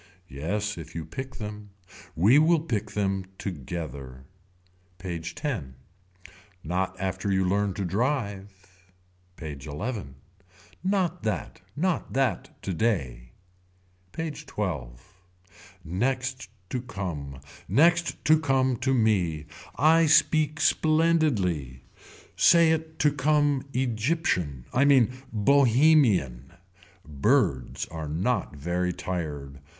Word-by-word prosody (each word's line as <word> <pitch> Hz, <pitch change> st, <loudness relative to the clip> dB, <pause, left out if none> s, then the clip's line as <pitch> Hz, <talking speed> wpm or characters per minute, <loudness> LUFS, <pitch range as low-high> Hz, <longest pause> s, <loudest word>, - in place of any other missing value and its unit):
Yes 100 Hz, +8 st, -3 dB
if 80 Hz, -1 st, -10 dB
you 80 Hz, -2 st, -4 dB
pick 130 Hz, -1 st, -7 dB
them. 105 Hz, -1 st, -7 dB, 0.5 s
We 110 Hz, -, +5 dB
will 160 Hz, +1 st, +4 dB
pick 110 Hz, -9 st, -2 dB
them 95 Hz, -2 st, 0 dB
together. 70 Hz, -6 st, -6 dB, 0.7 s
PAGE 85 Hz, -3 st, -5 dB
X. 125 Hz, -, -1 dB, 1.0 s
Not 95 Hz, +3 st, -2 dB
after 95 Hz, +1 st, -2 dB
you 95 Hz, -1 st, +2 dB
learn 100 Hz, 0 st, 0 dB
to 100 Hz, -, -2 dB
drive. 100 Hz, -, -1 dB, 0.8 s
PAGE 75 Hz, -5 st, -8 dB
XI. 100 Hz, -, -4 dB, 0.8 s
Not 185 Hz, -3 st, 0 dB
that. 110 Hz, -3 st, -3 dB
Not 180 Hz, +3 st, -1 dB
that 135 Hz, -3 st, -1 dB
today. 75 Hz, -, -2 dB, 0.8 s
PAGE 155 Hz, +3 st, -5 dB
XII. 75 Hz, -, -3 dB, 0.9 s
Next 130 Hz, +7 st, -2 dB, 0.2 s
to 125 Hz, -, -2 dB
come. 80 Hz, -, -6 dB, 0.3 s
Next 170 Hz, +3 st, +2 dB
to 155 Hz, 0 st, +5 dB
come 130 Hz, -4 st, +1 dB
to 130 Hz, +2 st, +1 dB
me. 90 Hz, -, +1 dB, 0.3 s
I 160 Hz, +4 st, +5 dB
speak 155 Hz, 0 st, +3 dB
splendidly. 125 Hz, -, +2 dB, 0.5 s
Say 170 Hz, -1 st, +6 dB
it 160 Hz, 0 st, -2 dB
to 150 Hz, -, +3 dB
come 145 Hz, -1 st, +1 dB
Egyptian. 115 Hz, -, -1 dB
I 130 Hz, -, +4 dB
mean 130 Hz, -4 st, +5 dB, 0.2 s
Bohemian. 115 Hz, -, +3 dB, 0.5 s
Birds 70 Hz, -3 st, +1 dB
are 80 Hz, -2 st, -6 dB
not 90 Hz, +4 st, -1 dB
very 90 Hz, +5 st, -1 dB
tired. 75 Hz, -6 st, -5 dB
105 Hz, 105 wpm, -26 LUFS, 85-140 Hz, 1.0 s, Say